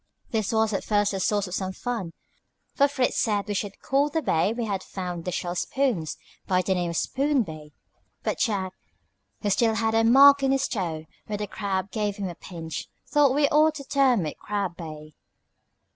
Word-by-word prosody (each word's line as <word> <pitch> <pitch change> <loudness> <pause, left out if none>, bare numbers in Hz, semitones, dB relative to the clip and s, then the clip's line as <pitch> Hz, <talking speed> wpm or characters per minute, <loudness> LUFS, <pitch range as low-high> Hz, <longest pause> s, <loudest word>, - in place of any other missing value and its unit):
This 215 -3 0
was 220 -1 +2
at 195 - -1
first 205 -1 +2
the 195 - -3
source 205 +1 +1
of 180 - -7
some 190 0 -2
fun, 225 -6 -4 0.6
for 280 - +4
Fritz 270 -3 0
said 205 -2 +1
we 205 - -2
should 200 0 -3
call 280 +2 +2
the 320 0 -1
bay 160 - +2
where 220 - -1
we 235 -1 -2
had 200 -3 -2
found 180 -4 -5
the 180 - -2
shell 175 0 -2
spoons 225 - -1 0.3
by 185 -1 +2
the 190 - +1
name 175 -2 -1
of 170 - -3
Spoon 275 -1 +1
Bay; 155 -4 -10 0.5
but - - -2
Jack, 190 -5 0 0.7
who 205 - +1
still 225 +3 +3
had 220 0 +1
a 225 0 +4
mark 275 +4 +8
on 270 - +2
his 270 0 +2
toe 165 -8 -3 0.2
where 210 - -3
the 210 - -3
crab 195 -1 -3
gave 210 -1 -1
him 200 -3 -3
a - - -6
pinch, 165 -1 -7 0.2
thought 285 -3 +4
we 290 0 +4
ought 310 +1 +4
to 280 - -6
term 270 - +2
it 150 - -6
Crab 200 -4 -2
Bay. 155 -2 -9
205 Hz, 205 wpm, -26 LUFS, 185-255 Hz, 0.7 s, mark